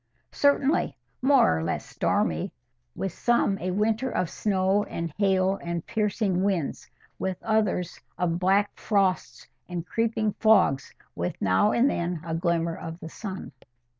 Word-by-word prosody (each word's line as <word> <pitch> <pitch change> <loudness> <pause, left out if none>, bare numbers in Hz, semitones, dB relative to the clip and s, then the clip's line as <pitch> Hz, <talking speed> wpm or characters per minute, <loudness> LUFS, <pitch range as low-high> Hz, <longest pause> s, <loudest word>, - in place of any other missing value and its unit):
"Certainly—more 275 - +2
or - - -3
less 85 - -2
stormy. 80 0 0 0.4
With 195 - -3
some 235 -4 +1
a 185 - -2
winter 220 +6 0
of 180 -7 -1
snow 195 0 +1
and 165 -2 -5
hail 195 -1 +2
and 170 -1 -4
piercing 205 -4 0
winds; 190 -7 -1 0.3
with 190 -1 -2
others 210 -5 0 0.2
of 170 -1 0
black 195 +3 +2
frosts 195 -3 0 0.2
and 175 -1 -4
creeping 220 0 0
fogs, 215 -11 +4 0.2
with 85 +1 -3
now 95 - +3
and 245 +3 +3
then 175 - -1
a 165 - -3
glimmer 170 0 0
of 165 +1 -7
the 160 - -8
sun." 190 +1 -7
190 Hz, 135 wpm, -26 LUFS, 170-215 Hz, 0.4 s, fogs